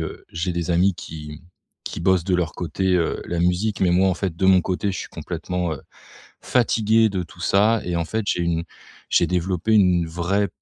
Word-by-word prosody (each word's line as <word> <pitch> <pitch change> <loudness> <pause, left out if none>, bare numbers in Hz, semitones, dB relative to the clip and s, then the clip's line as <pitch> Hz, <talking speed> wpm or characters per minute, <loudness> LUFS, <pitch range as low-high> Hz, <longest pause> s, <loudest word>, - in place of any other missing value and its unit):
heu, - - -6
j'ai 85 +2 -2
des 85 0 -2
amis 90 +3 +3
qui 75 -2 -9 0.4
qui - - -5
bossent 95 -1 +2
de 95 - +1
leur 85 -2 -1
côté, 95 +2 -1
heu, 85 - -1
la 85 - -3
musique, 90 +4 0
mais 90 - +3
moi 95 +2 +4
en 95 - +1
fait 90 -2 -3
de 95 +2 +1
mon 95 -1 +6
côté, 95 +3 -1
je - - -4
suis - - -6
complètement, 90 -3 -4
heu, 70 - -10 0.6
fatigué 115 -2 +3
de 95 -3 -2
tout 85 +1 -14
ça. 105 +4 +3
Et 90 -1 -2
en 85 - -1
fait 110 +5 -2
j'ai 90 - +1
une 85 -1 0 0.5
j'ai - - +3
développé 90 +4 0
une 90 -5 +4
vraie 90 +5 0
90 Hz, 210 wpm, -22 LUFS, 85-100 Hz, 0.6 s, mon